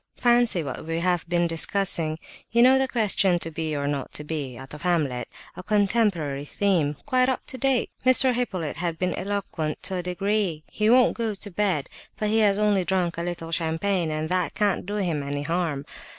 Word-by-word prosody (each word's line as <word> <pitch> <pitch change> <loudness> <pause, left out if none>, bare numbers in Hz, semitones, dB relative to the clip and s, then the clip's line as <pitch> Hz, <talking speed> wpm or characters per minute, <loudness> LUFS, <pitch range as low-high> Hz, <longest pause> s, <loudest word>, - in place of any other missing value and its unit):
Fancy 240 -7 +3
what 135 - -5
we 165 0 -1
have 175 -1 0
been 175 0 +2
discussing! 165 -1 0 0.3
You 235 +1 +4
know 260 +1 +6
the 265 - +1
question, 200 -6 +3
'to 165 -1 -5
be 155 -1 -3
or 140 0 -2
not 140 -2 -3
to 150 - -3
be,'—out 135 -4 -5
of 150 - -9
Hamlet! 150 -9 0 0.3
A - - -7
contemporary 195 -8 +1
theme! 160 -3 0
Quite 255 -2 +2
up 260 - -2
to 260 - -4
date! 270 -2 +1
Mr. 255 0 +5
Hippolyte 190 -11 -2
has 170 -1 -1
been 180 +2 -1
eloquent 190 -6 -3
to 185 0 -1
a - - -1
degree. 180 -2 -1
He 215 0 0
won't 250 +1 +5
go 225 -3 -1
to 205 +1 -6
bed, 180 -7 0 0.3
but 215 - -1
he 220 +1 +3
has 205 -2 +4
only 210 -3 +2
drunk 175 -2 -1
a - - -1
little 170 -1 -5
champagne, 165 +2 0
and 155 0 -2
that 180 -1 0
can't 205 -3 0
do 205 - -3
him 175 -8 -1
any 145 +1 -3
harm. 160 -3 -1
180 Hz, 195 wpm, -25 LUFS, 160-210 Hz, 0.3 s, know